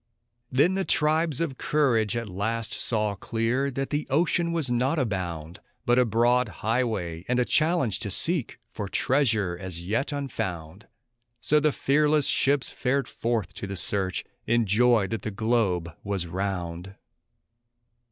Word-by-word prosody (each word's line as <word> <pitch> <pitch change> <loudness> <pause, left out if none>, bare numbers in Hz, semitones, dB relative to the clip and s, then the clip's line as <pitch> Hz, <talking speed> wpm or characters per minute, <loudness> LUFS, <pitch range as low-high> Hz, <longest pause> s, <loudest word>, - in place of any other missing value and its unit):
Then 145 +8 +4
the 190 0 0
tribes 155 -3 +1
of 145 -6 -2
courage 120 -8 +1
at 115 -1 -3
last 110 +4 -2
saw 105 -3 0
clear 115 +7 -1
that 135 0 -4
the 150 0 -1
ocean 170 +3 +1
was 160 -7 -1
not 130 +6 +1
a 130 - +2
bound, 90 -4 -4 0.3
But 120 0 +4
a 125 - +4
broad 120 +2 +2
highway, 105 -9 -2
and 125 - +1
a 125 - +2
challenge 155 - +1
to 105 - -3
seek 160 - +1
for 105 - -5
treasure 110 -11 +1
as 90 -3 -5
yet 115 - -1
unfound; 95 - -5 0.5
So 150 +5 +3
the 150 0 +2
fearless 150 +1 +2
ships 140 -1 +1
fared 135 0 0
forth 115 -2 -2
to 100 - -6
the 100 0 -5
search, 95 -1 0 0.2
in 120 0 +3
joy 115 +1 +4
that 110 +3 -4
the - - -3
globe 100 -6 0
was 100 -3 -2
round. 90 0 -4
115 Hz, 150 wpm, -26 LUFS, 100-140 Hz, 0.5 s, Then